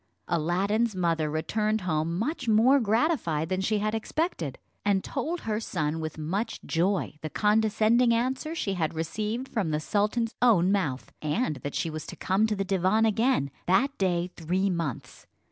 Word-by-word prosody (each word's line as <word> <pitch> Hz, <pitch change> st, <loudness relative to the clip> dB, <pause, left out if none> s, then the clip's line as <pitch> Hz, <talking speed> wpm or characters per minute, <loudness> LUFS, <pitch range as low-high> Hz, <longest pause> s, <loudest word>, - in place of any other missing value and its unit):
Aladdin's 195 Hz, +7 st, +1 dB
mother 165 Hz, -4 st, +1 dB
returned 215 Hz, +8 st, 0 dB
home 165 Hz, -1 st, -1 dB
much 250 Hz, -, -2 dB
more 230 Hz, +6 st, +5 dB
gratified 215 Hz, -, +1 dB
than 185 Hz, 0 st, 0 dB
she 210 Hz, +3 st, +1 dB
had 215 Hz, +1 st, -1 dB
expected, 220 Hz, -, -2 dB, 0.3 s
and 200 Hz, -2 st, +2 dB
told 320 Hz, +6 st, -3 dB
her 215 Hz, -1 st, -1 dB
son 160 Hz, -7 st, -2 dB
with 155 Hz, -1 st, -5 dB
much 195 Hz, +9 st, -2 dB
joy 175 Hz, -2 st, 0 dB
the 155 Hz, -, -4 dB
condescending 220 Hz, +4 st, +3 dB
answer 260 Hz, +7 st, 0 dB
she 200 Hz, -11 st, -1 dB
had 165 Hz, -3 st, -1 dB
received 215 Hz, +10 st, -3 dB
from 205 Hz, -10 st, -1 dB
the 150 Hz, -1 st, 0 dB
sultan's 215 Hz, +7 st, 0 dB
own 195 Hz, -7 st, +5 dB
mouth; 150 Hz, -11 st, -1 dB
and 155 Hz, -, -1 dB
that 145 Hz, +2 st, -6 dB
she 165 Hz, -, -1 dB
was 155 Hz, -1 st, -6 dB
to -, -, -7 dB
come 195 Hz, +4 st, +1 dB
to 215 Hz, -, -1 dB
the 195 Hz, 0 st, -2 dB
divan 195 Hz, +3 st, +2 dB
again 220 Hz, -, +2 dB, 0.2 s
that 260 Hz, +10 st, +3 dB
day 180 Hz, -2 st, 0 dB
three 185 Hz, +4 st, 0 dB
months. 165 Hz, -8 st, -4 dB
195 Hz, 165 wpm, -27 LUFS, 165-225 Hz, 0.3 s, more